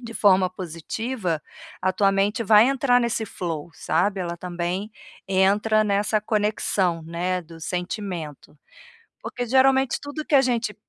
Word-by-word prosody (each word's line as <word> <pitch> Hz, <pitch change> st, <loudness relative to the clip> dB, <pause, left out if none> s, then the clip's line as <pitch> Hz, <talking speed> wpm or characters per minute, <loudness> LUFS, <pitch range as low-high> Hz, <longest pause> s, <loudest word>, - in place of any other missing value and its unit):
de 230 Hz, -2 st, -9 dB
forma 190 Hz, -3 st, +4 dB
positiva, 180 Hz, +2 st, -4 dB, 0.4 s
a 185 Hz, 0 st, +2 dB
tua 195 Hz, +1 st, +2 dB
mente 205 Hz, +4 st, 0 dB
vai 215 Hz, +4 st, +6 dB
entrar 260 Hz, -2 st, +3 dB
nesse 230 Hz, -2 st, -1 dB
flow, 170 Hz, -5 st, -5 dB
sabe. 200 Hz, +1 st, 0 dB
Ela 170 Hz, -1 st, -4 dB
também 180 Hz, +4 st, -4 dB, 0.3 s
entra 200 Hz, +3 st, +3 dB
nessa 210 Hz, +1 st, +1 dB
conexão, 205 Hz, -5 st, 0 dB
né, 175 Hz, +3 st, -2 dB
do 165 Hz, 0 st, -14 dB
sentimento, 175 Hz, -4 st, -5 dB, 0.6 s
porque 245 Hz, -, -5 dB
geralmente 265 Hz, +1 st, +3 dB
tudo 290 Hz, +2 st, -6 dB
que -, -, -1 dB
a 275 Hz, -, +8 dB
gente 235 Hz, -5 st, -1 dB
200 Hz, 140 wpm, -24 LUFS, 180-230 Hz, 0.6 s, a